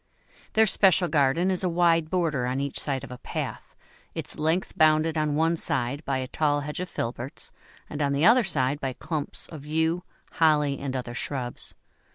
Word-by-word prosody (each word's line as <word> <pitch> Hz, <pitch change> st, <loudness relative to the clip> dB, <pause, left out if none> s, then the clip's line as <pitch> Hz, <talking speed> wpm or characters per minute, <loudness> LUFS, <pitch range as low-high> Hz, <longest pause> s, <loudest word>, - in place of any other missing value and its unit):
Their 220 Hz, 0 st, +5 dB
special 190 Hz, -3 st, +4 dB
garden 155 Hz, +4 st, +2 dB
is 185 Hz, 0 st, +1 dB
a 180 Hz, -, +1 dB
wide 165 Hz, -2 st, +2 dB
border 160 Hz, -9 st, 0 dB
on 130 Hz, +2 st, -1 dB
each 140 Hz, 0 st, -2 dB
side 135 Hz, -3 st, -2 dB
of 135 Hz, -, -9 dB
a 125 Hz, -, -8 dB
path, -, -, -6 dB, 0.4 s
its -, -, -4 dB
length 160 Hz, +4 st, 0 dB
bounded 155 Hz, +1 st, +3 dB
on 155 Hz, -2 st, 0 dB
one 165 Hz, +2 st, +2 dB
side 140 Hz, -1 st, -1 dB
by 135 Hz, -1 st, 0 dB
a 130 Hz, 0 st, -3 dB
tall 145 Hz, +1 st, +1 dB
hedge 150 Hz, +3 st, -5 dB
of 180 Hz, -1 st, -4 dB
filberts, 120 Hz, +3 st, -5 dB, 0.4 s
and 150 Hz, -, -5 dB
on 140 Hz, -1 st, +1 dB
the 140 Hz, +4 st, +2 dB
other 235 Hz, +4 st, +6 dB
side 145 Hz, -6 st, 0 dB
by 135 Hz, -2 st, -3 dB
clumps 155 Hz, +2 st, -2 dB
of 155 Hz, -4 st, -9 dB
yew, 160 Hz, +3 st, 0 dB, 0.3 s
holly, 150 Hz, -3 st, +2 dB
and 135 Hz, -1 st, -4 dB
other 125 Hz, -2 st, -4 dB
shrubs. 125 Hz, -1 st, -4 dB
150 Hz, 190 wpm, -26 LUFS, 135-165 Hz, 0.4 s, other